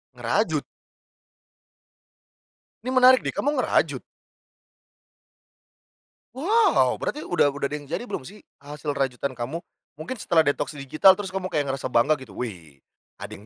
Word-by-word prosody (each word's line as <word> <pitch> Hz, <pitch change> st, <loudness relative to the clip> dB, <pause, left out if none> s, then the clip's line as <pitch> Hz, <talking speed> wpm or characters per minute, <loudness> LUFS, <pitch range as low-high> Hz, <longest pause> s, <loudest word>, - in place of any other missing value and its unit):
Ngerajut? -, -, 0 dB, 2.2 s
Ini 255 Hz, -, -2 dB
menarik 255 Hz, 0 st, +6 dB
deh, -, -, -2 dB
kamu 290 Hz, +1 st, -1 dB
ngerajut? -, -, +1 dB, 2.3 s
Wow! 420 Hz, -, +3 dB
Berarti 300 Hz, -, -3 dB
udah 175 Hz, -4 st, +2 dB
udah 140 Hz, -1 st, -2 dB
ada -, -, -2 dB
yang 145 Hz, -, -14 dB
jadi 170 Hz, -, -3 dB
belum 190 Hz, -, -5 dB
sih, 210 Hz, +1 st, -14 dB, 0.2 s
hasil 145 Hz, +1 st, -5 dB
rajutan 135 Hz, -1 st, -2 dB
kamu? 130 Hz, +7 st, -5 dB, 0.3 s
Mungkin 165 Hz, +11 st, -6 dB
setelah 165 Hz, -4 st, +3 dB
detoks 145 Hz, +1 st, -1 dB
digital 155 Hz, +7 st, +4 dB
terus 195 Hz, -2 st, -6 dB
kamu 190 Hz, -1 st, -3 dB
kayak 150 Hz, -6 st, -1 dB
ngerasa 135 Hz, -1 st, -3 dB
bangga 135 Hz, +5 st, +3 dB
gitu, 115 Hz, -7 st, -12 dB
"Wih, 85 Hz, -, -8 dB, 0.3 s
ada -, -, -9 dB
yang 105 Hz, -, -11 dB
150 Hz, 140 wpm, -24 LUFS, 135-195 Hz, 2.3 s, menarik